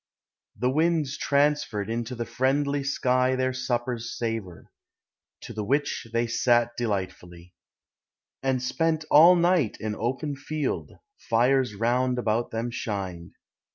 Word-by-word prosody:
The 125 +4 +1
winds 155 -2 +1
transferred 145 -9 +1
into 115 +2 -3
the 115 0 -3
friendly 140 +4 0
sky 130 -1 +1
Their 130 0 0
supper's 120 -2 -3
savor; 115 -7 -5 0.7
to - - -8
the 105 - -3
which 140 +1 -1
they 115 +1 +1
sat 120 0 +2
de 120 - -2
lightfully, 90 -3 -5 0.9
And 130 -2 0
spent 160 +3 0
all 170 +5 +8
night 170 - +2
in 110 -1 -3
open 135 +6 -2
held; 155 -1 -2 0.3
fires 125 0 +2
round 125 +4 +1
about 115 0 0
them 115 +2 -3
shined. 95 -7 -5
125 Hz, 125 wpm, -26 LUFS, 115-140 Hz, 0.9 s, all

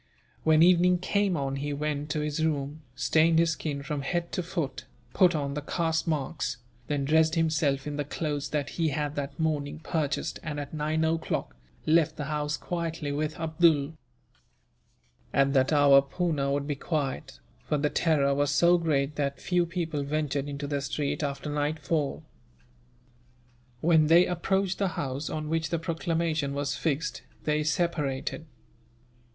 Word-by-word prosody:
When 160 0 +5
evening 180 0 +5
came 195 0 +1
on, 135 -1 -2
he 145 +1 -3
went 150 0 -2
to 150 0 -1
his 150 +1 -1
room, 150 -1 -1
stained 160 +5 +3
his 165 0 +4
skin 145 -3 -3
from 145 0 -3
head 170 +4 -2
to - - -1
foot, 165 -7 -4 0.3
put 180 -2 +4
on 140 -2 -2
the 150 - -3
caste 160 +2 -1
marks, 150 -4 -2 0.3
then 145 -2 -1
dressed 160 +2 +3
himself 155 -4 +1
in 150 -1 -4
the 145 - 0
clothes 145 0 -3
that 145 -2 -1
he 165 - +3
had 150 -1 -1
that 145 +2 -5
morning 150 -2 -1
purchased 155 -5 -2
and, 155 -4 -4
at 145 +1 -6
nine 155 +1 0
o'clock, 160 0 -1 0.3
left 160 0 +3
the 150 - -4
house 150 0 -2
quietly 165 -4 -3
with 150 +2 -2
Abdool. 160 -2 +2 1.4
At 140 0 +3
that 130 +1 +3
hour 145 -2 +7
Poona 140 -1 -1
would 140 0 0
be 145 - -1
quiet, 140 -2 -3 0.3
for 150 - +1
the 150 +1 0
terror 145 -5 +2
was 145 0 +1
so 170 +4 +4
great 150 -3 0
that 140 -1 -1
few 175 -1 +1
people 165 -4 -2
ventured 145 -1 -1
into 140 0 -4
the 140 -1 -2
street 145 +1 -2
after 140 0 -3
nightfall. 150 0 -1 1.6
When 160 -2 +4
they 170 +3 +7
approached 190 +2 0
the 200 - +2
house 135 +2 -3
on 155 -1 -3
which 160 0 -1
the 170 - 0
proclamation 165 -3 -1
was 145 0 -1
fixed, 160 0 -2 0.2
they 150 0 +1
separated. 155 -1 -1
150 Hz, 160 wpm, -28 LUFS, 145-165 Hz, 1.6 s, hour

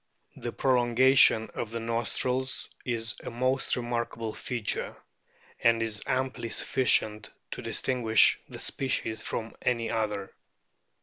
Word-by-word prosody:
The - - -5
prolongation 125 -2 +4
of 115 - -4
the 115 +1 -4
nostrils 120 +3 -1 0.2
is 115 -2 -2
a - - -5
most 130 +2 0
remarkable 120 -2 -3
feature, 120 -4 -3 0.6
and 115 -1 +4
is 110 -2 -1
amply 130 -2 -1
sufficient 110 -4 +1 0.2
to - - -5
distinguish 115 -4 +3
the - - -8
species 110 -5 -1
from 115 -1 -4
any 115 -2 0
other. 105 -3 -2
115 Hz, 115 wpm, -28 LUFS, 110-125 Hz, 0.6 s, prolongation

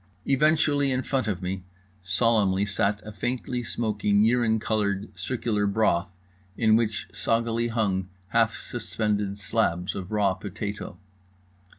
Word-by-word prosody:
Eventually, 145 0 +3
in 130 0 0
front 130 -5 -1
of 95 -3 -2
me, 90 0 -3 0.4
solemnly 100 0 +2
sat 100 +1 0
a 105 - -6
faintly 125 +4 -2
smoking 105 -3 +1
urine 115 -1 +3
coloured 105 -2 -1
circular 110 -5 -1
broth, 100 -5 +2 0.5
in 110 -2 +4
which 110 -1 0
soggily 115 0 0
hung 100 -5 0 0.2
half 115 0 +2
suspended 105 -4 -2
slabs 95 -3 0
of 95 +1 -6
raw 105 -3 +2
potato. 100 +2 -6
110 Hz, 120 wpm, -26 LUFS, 100-115 Hz, 0.5 s, in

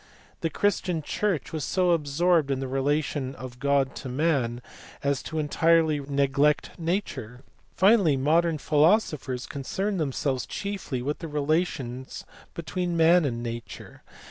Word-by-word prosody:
The 165 - -1
Christian 180 -2 0
Church 190 -2 -2
was 155 -2 -2
so 180 +3 +1
absorbed 165 0 +2
in 135 -1 0
the 135 - -3
relation 135 0 -1
of 125 -1 -9
God 140 -1 +1
to 130 - -6
Man 130 -4 0 0.4
as 140 -1 0
to 160 - -6
entirely 160 0 +3
neglect 140 +1 +1
Nature. 150 - -3 0.3
Finally 190 -7 +4
modern 160 +4 +2
philosophers 150 - +1
concern 190 +9 -3
themselves 135 -4 -1
chiefly 195 -11 -4
with 145 +3 -2
the 165 - -6
relations 145 -4 -2 0.3
between 175 0 -3
Man 165 +1 +5
and 120 -3 -2
Nature. 115 0 -7
150 Hz, 130 wpm, -26 LUFS, 135-170 Hz, 0.4 s, Man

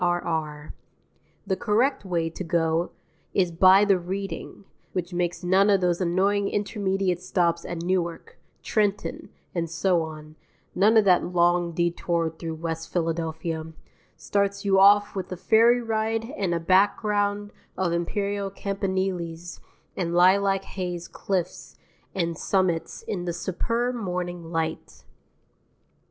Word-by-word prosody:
R.R. 160 -4 -2 0.7
The 195 -1 0
correct 240 +5 +1
way 170 -3 -1
to 175 - -6
go 165 -1 0 0.5
is 180 -3 +2
by 185 +4 +6
the 195 -3 +3
Reading, 195 +2 -6 0.3
which 180 0 -3
makes 175 +1 -2
none 190 +3 +4
of 200 -1 +4
those 180 0 0
annoying 195 +3 +1
intermediate 195 -3 -1
stops 170 -2 0
at 170 -1 -5
Newark, 175 -2 -2 0.2
Trenton, 205 -3 -1 0.2
and 170 -2 -2
so 170 +1 +1
on, 155 -1 -8 0.4
none 215 +4 +4
of 215 - +5
that 180 -2 +5
long 175 0 +2
detour 170 -1 0
through 160 0 -6
West 165 0 -5
Philadelphia, 160 -1 -2 0.4
starts 200 0 -1
you 195 -1 +4
off 205 +1 +5
with 190 -2 -4
a 185 - -4
ferry 230 +6 +4
ride 225 +2 -1
and 180 -4 -1
a - - 0
background 205 +3 +1 0.3
of 180 -3 0
imperial 200 +3 -2
campaniles 190 -4 -3 0.4
and 170 -2 -2
lilac 195 +2 +4
hazed 180 -3 -5
cliffs 185 -2 -3 0.4
and 170 -3 -1
summits 185 -4 0
in 180 -4 -4
the 175 - -2
superb 230 +8 -1
morning 180 -6 -4
light. 165 -1 -4
180 Hz, 130 wpm, -25 LUFS, 170-200 Hz, 0.7 s, by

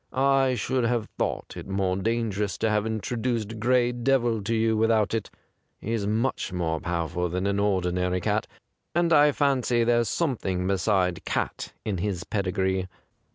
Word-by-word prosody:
I 135 -1 +3
should 125 +2 0
have 115 -2 0
thought - - -2
it - - -8
more 95 -1 0
dangerous 105 -1 -1
to 110 - +1
have 105 0 +1
introduced 115 0 -2
Gray 120 +1 +3
Devil 120 -2 +1
to 115 +2 0
you 110 0 +2
without 110 -1 +2
it. 110 -3 -2 0.5
He's 110 -2 -2
much 110 0 -1
more 85 -3 -1
powerful 85 +1 -2
than 90 +3 -2
an 100 0 +1
ordi 95 -3 +1
nary 90 0 0
cat, - - 0 0.5
and 170 -1 +3
I 150 -1 +6
fancy 130 -4 +2
there's 120 0 +2
some 150 -8 0
thing 90 -2 -2
beside 95 -2 +1
cat - - -3
in 100 -4 -2
his 95 -1 -2
pedigree. 95 -2 -1
110 Hz, 160 wpm, -26 LUFS, 95-120 Hz, 0.5 s, I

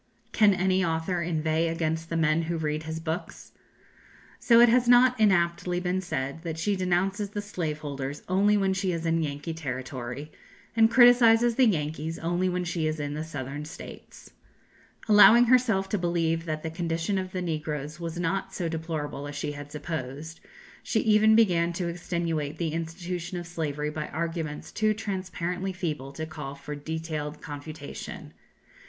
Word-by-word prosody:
Can 210 -3 +5
any 185 0 +2
author 165 +1 -1
inveigh 160 -1 0
against 165 0 -2
the 165 - -1
men 160 0 +2
who 170 - -1
read 155 -1 -2
his 160 0 -4
books? 165 +3 -5 0.9
So 230 -1 +5
it 240 - +8
has 240 +1 +3
not 245 0 +6
inaptly 175 -3 +2
been 180 +1 -1
said 140 -4 -3
that 165 -2 -5
she 200 +5 0
denounces 190 +3 0
the 205 - -4
slave 170 -7 -3
holders 140 -1 -5
only 200 +3 +3
when 195 -1 +2
she 190 -1 -1
is 165 0 -3
in 165 0 +2
Yankee 150 +2 -3
territory, 130 -1 -5 0.4
and 225 -1 +5
criticises 240 -1 +6
the 255 +1 +4
Yankees 160 -3 -1
only 175 +2 0
when 180 0 -1
she 170 -2 -1
is 155 0 -2
in 145 0 -3
the 155 +1 -3
Southern 145 -2 -6
States. 160 +3 -11 0.8
Allowing 220 +3 +8
herself 235 -6 +3
to 205 - 0
believe 165 -1 0
that 155 -1 -3
the 160 - -3
condition 165 +3 -1
of 185 0 -5
the 185 - -3
negroes 155 -2 -4
was 170 0 -5
not 180 +3 -2
so 175 - -2
deplorable 160 -3 -4
as 145 - -7
she 145 +1 -3
had 145 0 -9
supposed, 150 0 -5 0.4
she 220 - 0
even 220 0 +5
began 175 -6 +3
to 175 0 -2
extenuate 170 -3 -2
the 160 -2 -2
institution 170 +2 -4
of 175 - -5
slavery 150 -3 -3
by 150 0 -4
arguments 165 -2 -4
too 215 -1 +1
transparently 185 -2 -3
feeble 155 -7 -4
to 160 +3 -5
call 140 -3 -7
for 150 +1 -7
detailed 155 0 -4
confutation. 145 0 -8
165 Hz, 165 wpm, -27 LUFS, 155-185 Hz, 0.9 s, it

